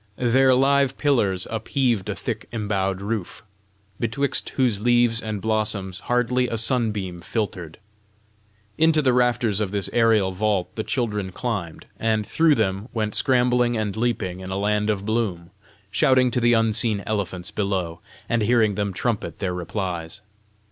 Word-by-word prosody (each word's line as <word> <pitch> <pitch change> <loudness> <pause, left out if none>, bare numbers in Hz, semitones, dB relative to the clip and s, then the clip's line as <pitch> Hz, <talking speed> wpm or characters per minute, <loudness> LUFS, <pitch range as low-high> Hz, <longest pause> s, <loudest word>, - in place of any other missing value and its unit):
Their 130 +3 +3
live 135 0 +2
pillars 105 -11 +1
upheaved 115 -2 0
a - - -2
thick - - -5
embowed 100 -4 -2
roof, 105 -2 -4 0.6
betwixt 125 +5 0
whose 125 -7 +2
leaves 120 0 +3
and 110 -2 -4
blossoms 105 -3 -1
hardly 125 +1 +1
a 115 - -3
sunbeam 110 -7 0
filtered. 90 -4 -4 1.0
Into 160 -1 +4
the 130 -2 +3
rafters 120 -4 +2
of 105 - -1
this 100 0 -2
aerial 110 -5 +3
vault 95 -2 -1
the 110 - -2
children 105 -7 -2
climbed, 95 -6 -4
and 110 -1 0
through 160 +6 +3
them 100 0 -1
went 110 -2 -1
scrambling 125 -2 +2
and 105 -3 -2
leaping 110 -6 -2
in 95 0 -8
a 95 - -3
land 105 +1 0
of 100 -2 -1
bloom, 100 -6 -2 0.4
shouting 130 -1 +3
to 125 - 0
the 120 0 +4
unseen 110 -2 +2
elephants 95 -4 -3
below, 95 -5 -2 0.3
and 120 -1 0
hearing 110 -1 +3
them 100 -1 -2
trumpet 115 +3 -2
their 95 -2 -2
replies. 90 0 -4
110 Hz, 150 wpm, -23 LUFS, 95-120 Hz, 1.0 s, Into